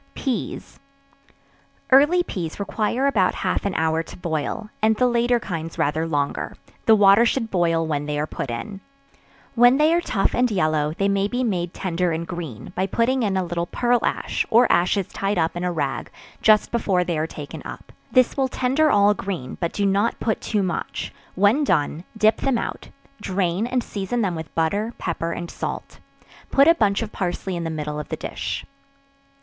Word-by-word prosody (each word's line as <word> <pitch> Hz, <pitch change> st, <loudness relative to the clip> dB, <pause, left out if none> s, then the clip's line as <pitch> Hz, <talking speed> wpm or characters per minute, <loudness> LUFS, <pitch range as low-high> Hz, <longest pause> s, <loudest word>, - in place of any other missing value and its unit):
Peas. 260 Hz, -4 st, -4 dB, 1.1 s
Early 295 Hz, +7 st, +6 dB
peas 170 Hz, -, -5 dB
require 220 Hz, +5 st, -1 dB
about 215 Hz, -10 st, +2 dB
half 185 Hz, +1 st, -1 dB
an 195 Hz, -, -3 dB
hour 160 Hz, 0 st, +1 dB
to 165 Hz, -, -11 dB
boil, 175 Hz, +6 st, -3 dB
and 220 Hz, 0 st, +4 dB
the 250 Hz, -, +2 dB
later 240 Hz, 0 st, +2 dB
kinds 165 Hz, -6 st, -5 dB
rather 155 Hz, +3 st, 0 dB
longer; 145 Hz, -3 st, -2 dB, 0.3 s
the 220 Hz, -, +8 dB
water 200 Hz, +1 st, +6 dB
should 230 Hz, -1 st, 0 dB
boil 165 Hz, -3 st, +2 dB
when 145 Hz, -2 st, -2 dB
they 150 Hz, 0 st, -2 dB
are 150 Hz, -, 0 dB
put 140 Hz, -, -5 dB
in; 190 Hz, -, -5 dB, 0.7 s
when 245 Hz, +2 st, +6 dB
they 305 Hz, +2 st, +4 dB
are 345 Hz, -, +2 dB
tough 195 Hz, -, 0 dB
and 250 Hz, 0 st, +2 dB
yellow, 155 Hz, -6 st, +1 dB
they 200 Hz, -, +1 dB
may 200 Hz, 0 st, +1 dB
be 245 Hz, +4 st, -2 dB
made 180 Hz, -7 st, -1 dB
tender 180 Hz, -2 st, -1 dB
and 165 Hz, +1 st, -2 dB
green, 165 Hz, -6 st, -7 dB
by 190 Hz, +1 st, 0 dB
putting 245 Hz, +6 st, +1 dB
in 200 Hz, -4 st, 0 dB
a 190 Hz, -, +1 dB
little 175 Hz, 0 st, -3 dB
pearl 240 Hz, +3 st, +1 dB
ash, -, -, -1 dB
or 240 Hz, +2 st, +6 dB
ashes 180 Hz, +2 st, +2 dB
tied 195 Hz, 0 st, -2 dB
up 165 Hz, 0 st, +1 dB
in 175 Hz, -, -3 dB
a 180 Hz, -, 0 dB
rag, 140 Hz, -6 st, -2 dB, 0.3 s
just 215 Hz, -1 st, +4 dB
before 195 Hz, -6 st, +1 dB
they 175 Hz, -1 st, -2 dB
are 155 Hz, +1 st, -1 dB
taken 150 Hz, -3 st, -8 dB
up; -, -, -9 dB, 0.2 s
this 255 Hz, -2 st, +4 dB
will 270 Hz, -1 st, +1 dB
tender 265 Hz, +5 st, +1 dB
all 205 Hz, -3 st, +5 dB
green 185 Hz, -11 st, -5 dB
but 170 Hz, -2 st, -1 dB
do 200 Hz, -, -1 dB
not 200 Hz, +4 st, +1 dB
put 220 Hz, -, -1 dB
too 210 Hz, -3 st, 0 dB
much 180 Hz, -2 st, -3 dB, 0.2 s
when 205 Hz, +10 st, +3 dB
done, 155 Hz, -, 0 dB
dip 215 Hz, 0 st, +4 dB
them 270 Hz, -3 st, 0 dB
out: -, -, -5 dB, 0.3 s
drain 190 Hz, +2 st, -1 dB
and 250 Hz, -1 st, 0 dB
season 210 Hz, +4 st, -2 dB
them 190 Hz, -3 st, 0 dB
with 160 Hz, -1 st, -7 dB
butter, 205 Hz, +8 st, 0 dB
pepper 170 Hz, -1 st, -3 dB
and 170 Hz, 0 st, -5 dB
salt; -, -, -6 dB, 0.5 s
put 275 Hz, +2 st, +5 dB
a 330 Hz, -, +8 dB
bunch 210 Hz, -7 st, +1 dB
of 215 Hz, -, -6 dB
parsley 185 Hz, 0 st, -3 dB
in 170 Hz, -, -3 dB
the -, -, -2 dB
middle 150 Hz, -1 st, -4 dB
of 150 Hz, -, -7 dB
the -, -, -3 dB
dish. -, -, -4 dB
195 Hz, 190 wpm, -23 LUFS, 165-230 Hz, 1.1 s, the